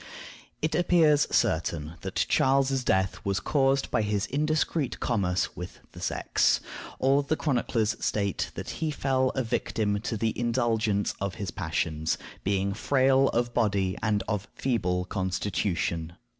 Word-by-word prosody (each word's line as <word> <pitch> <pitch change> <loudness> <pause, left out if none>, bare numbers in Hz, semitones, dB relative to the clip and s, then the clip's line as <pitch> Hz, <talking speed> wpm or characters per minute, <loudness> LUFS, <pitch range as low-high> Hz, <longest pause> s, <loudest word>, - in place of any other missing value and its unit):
It 155 0 +1
appears 160 -3 +4
certain 80 -1 0
that - - -1
Charles's 135 0 +2
death 95 -4 +1
was 100 0 0
caused 135 +2 +1
by - - +2
his 105 0 0
indiscreet 155 +1 0
commerce 95 -6 0
with 90 +1 -7
the - - -11
sex. - - +2 0.4
All 135 +2 +3
the 145 +2 -1
chroniclers 120 -7 0
state 100 -3 0
that - - -5
he 160 - +1
fell 135 -3 +1
a 130 - +1
victim 105 -2 -1
to 110 - -3
the 110 +1 0
indulgence 115 -4 +1
of 100 -1 -2
his 100 -5 -4
passions, 80 -1 -1 0.3
being 100 0 0
frail 135 +4 +3
of 120 0 0
body 100 -5 +1
and 105 -2 +1
of 105 -2 -2
feeble 90 -8 0
constitution. 90 -3 -2
110 Hz, 140 wpm, -27 LUFS, 95-135 Hz, 0.4 s, appears